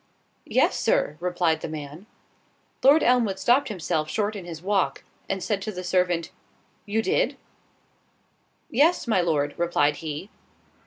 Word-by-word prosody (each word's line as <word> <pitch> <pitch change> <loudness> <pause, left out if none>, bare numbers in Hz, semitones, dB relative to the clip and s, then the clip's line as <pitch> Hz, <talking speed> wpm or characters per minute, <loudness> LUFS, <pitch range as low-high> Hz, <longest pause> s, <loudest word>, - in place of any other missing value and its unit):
"Yes, - - +2
Sir," 145 - +1
replied 175 -2 0
the - - -4
man. 155 +5 -8 0.7
Lord 285 +4 +6
Elmwood 235 -6 +2
stopped 265 +6 +3
himself 160 -7 -2
short 210 +5 -1
in 190 -4 -7
his 165 -2 -7
walk, 190 -8 0 0.3
and 190 -2 -2
said 205 -3 -1
to 215 - -4
the 180 -2 -6
servant, 180 -2 0 0.6
"You 220 +2 0
did?" - - +1 1.3
"Yes, 305 +8 +3
my 220 -6 +2
Lord," 150 -4 0
replied 150 -4 +2
he. 160 +5 -6
180 Hz, 140 wpm, -25 LUFS, 160-215 Hz, 1.3 s, Lord